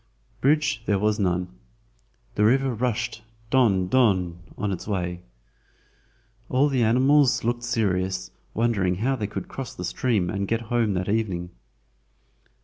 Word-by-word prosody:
Bridge 145 -3 +2
there 100 - +3
was 105 +2 +1
none. 90 -1 -1 0.7
The 105 - +1
river 130 +4 +3
rushed 120 0 -2 0.3
"don, 105 -8 +3
don" 95 -7 +2 0.2
on 100 0 -1
its 95 - -5
way. 90 -3 -2 1.3
All 135 +3 +3
the 130 -3 +1
animals 130 +4 +4
looked 120 +1 0
serious, 95 -6 -1 0.2
wondering 105 -6 +1
how 125 +8 0
they 110 -5 -3
could 105 - -6
cross 135 -2 -7
the 90 - -5
stream 105 -2 0
and 100 +2 -2
get 115 +2 0
home 115 -4 +2
that 90 0 -2
evening. 95 -5 -1
110 Hz, 140 wpm, -25 LUFS, 95-125 Hz, 1.3 s, animals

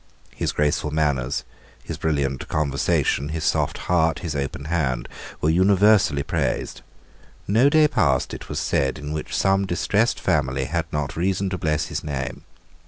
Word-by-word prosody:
His - - -1
graceful 75 0 0
manners, 70 -3 0 0.4
his - - -6
brilliant 70 -4 -1
conversation, 70 -1 0
his 80 0 -3
soft - - +1
heart, 80 -2 +2
his 80 -3 -3
open 70 0 -3
hand, 75 -7 -1 0.3
were 80 - +3
universally 95 -4 +4
praised. - - -2 0.7
No 115 +8 +4
day 155 +1 +5
passed, 80 - +1
it - - -8
was - - -4
said, 70 +1 0
in 75 0 -5
which 75 - -3
some 95 0 +2
distressed 105 +5 +1
family 65 -2 0
had 80 +3 -3
not 75 0 -2
reason 95 +2 0
to 95 - -2
bless 75 -1 0
his - - -4
name. 70 -3 -4
75 Hz, 155 wpm, -23 LUFS, 70-95 Hz, 0.7 s, day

